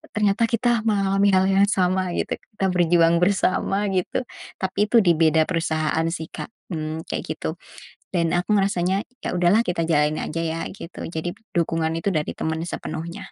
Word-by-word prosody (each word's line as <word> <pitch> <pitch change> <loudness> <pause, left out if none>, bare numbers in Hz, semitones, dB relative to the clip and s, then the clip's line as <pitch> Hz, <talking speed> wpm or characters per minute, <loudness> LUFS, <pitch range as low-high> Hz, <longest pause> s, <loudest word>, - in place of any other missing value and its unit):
ternyata 210 +1 +2
kita 240 0 +2
mengalami 200 -1 +2
hal 185 - +4
yang 195 +1 +4
sama, 185 -2 +1
gitu, - - -1 0.2
kita 195 - 0
berjuang 170 -1 +4
bersama, 195 +1 +1
gitu. 185 +6 -1 0.4
Tapi 195 +2 0
itu 240 - +4
dibeda 160 -2 +4
perusahaan, 160 -1 0
sih, 160 -1 -5
Kak, - - -7 0.2
mmm, 155 0 -4
kayak - - -2
gitu. 160 - -4 0.6
Dan 170 -1 +1
aku 180 +4 0
ngerasanya, 195 0 +1 0.2
ya, - - -2
udahlah 180 +5 +4
kita 170 -2 0
jalanin 150 -1 +2
aja, 165 - -3
ya, 165 0 -2
gitu, 175 -3 -9
jadi 165 +1 -3 0.2
dukungan 165 -1 +1
itu 200 - 0
dari 150 - 0
teman 160 0 -2
sepenuhnya. 165 +1 -5
175 Hz, 160 wpm, -23 LUFS, 160-195 Hz, 0.6 s, hal